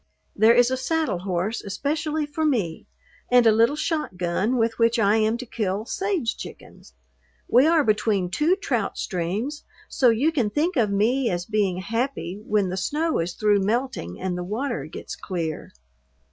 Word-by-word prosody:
There 220 Hz, +3 st, +5 dB
is 245 Hz, +1 st, +4 dB
a 260 Hz, -, 0 dB
saddle 310 Hz, -, -1 dB
horse 190 Hz, +4 st, -2 dB
especially 300 Hz, +9 st, -2 dB
for 295 Hz, +2 st, -4 dB
me 215 Hz, -, -1 dB, 0.4 s
and 245 Hz, -1 st, +5 dB
a 225 Hz, -, +7 dB
little 230 Hz, +6 st, +3 dB
shotgun 230 Hz, -, -1 dB
with 225 Hz, 0 st, 0 dB
which 230 Hz, +1 st, +3 dB
I 215 Hz, -1 st, +3 dB
am 220 Hz, +1 st, +1 dB
to 255 Hz, -, -7 dB
kill 210 Hz, -2 st, -2 dB
sage 380 Hz, -, -1 dB
chickens. 65 Hz, -, -11 dB, 0.5 s
We 255 Hz, +5 st, +5 dB
are 325 Hz, -2 st, +4 dB
between 210 Hz, -5 st, +1 dB
two 310 Hz, -, +2 dB
trout 395 Hz, -, -2 dB
streams, 205 Hz, -, -3 dB, 0.2 s
so 255 Hz, -, +3 dB
you 250 Hz, +8 st, +2 dB
can 250 Hz, -10 st, 0 dB
think 315 Hz, -, 0 dB
of 230 Hz, -6 st, +2 dB
me 230 Hz, +6 st, +1 dB
as 175 Hz, -1 st, -2 dB
being 200 Hz, -4 st, 0 dB
happy 225 Hz, -2 st, -3 dB
when 205 Hz, -3 st, +1 dB
the 185 Hz, -, -3 dB
snow 310 Hz, -, 0 dB
is 170 Hz, +1 st, -2 dB
through 210 Hz, -2 st, +2 dB
melting 210 Hz, -, -2 dB
and 185 Hz, -1 st, -2 dB
the 180 Hz, -, -4 dB
water 215 Hz, -, -3 dB
gets 155 Hz, -, -8 dB
clear. 165 Hz, -5 st, -4 dB
225 Hz, 170 wpm, -24 LUFS, 190-275 Hz, 0.5 s, a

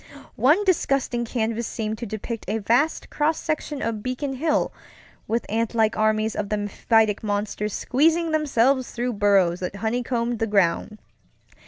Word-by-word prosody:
One 305 Hz, +11 st, +4 dB
disgusting 275 Hz, -9 st, +1 dB
canvas 230 Hz, 0 st, -2 dB
seemed 220 Hz, -1 st, -4 dB
to 235 Hz, -, -5 dB
depict 220 Hz, +2 st, -5 dB
a 210 Hz, +3 st, 0 dB
vast 240 Hz, +9 st, +1 dB
cross 310 Hz, +2 st, +1 dB
section 305 Hz, -2 st, -3 dB
of 225 Hz, -2 st, -2 dB
Beacon 255 Hz, +4 st, -3 dB
Hill, 300 Hz, +4 st, 0 dB, 0.5 s
with 230 Hz, +1 st, -1 dB
antlike 225 Hz, 0 st, +1 dB
armies 215 Hz, 0 st, +1 dB
of 205 Hz, -1 st, -3 dB
the 210 Hz, -, 0 dB
mephitic 210 Hz, +1 st, +1 dB
monsters 210 Hz, 0 st, -2 dB
squeezing 325 Hz, +5 st, +2 dB
themselves 275 Hz, -4 st, +2 dB
through 245 Hz, +1 st, -2 dB
burrows 195 Hz, -4 st, +3 dB
that 180 Hz, +1 st, -4 dB
honeycombed 235 Hz, +2 st, -1 dB
the 225 Hz, -, 0 dB
ground. 205 Hz, +1 st, +1 dB
230 Hz, 145 wpm, -24 LUFS, 215-260 Hz, 0.5 s, One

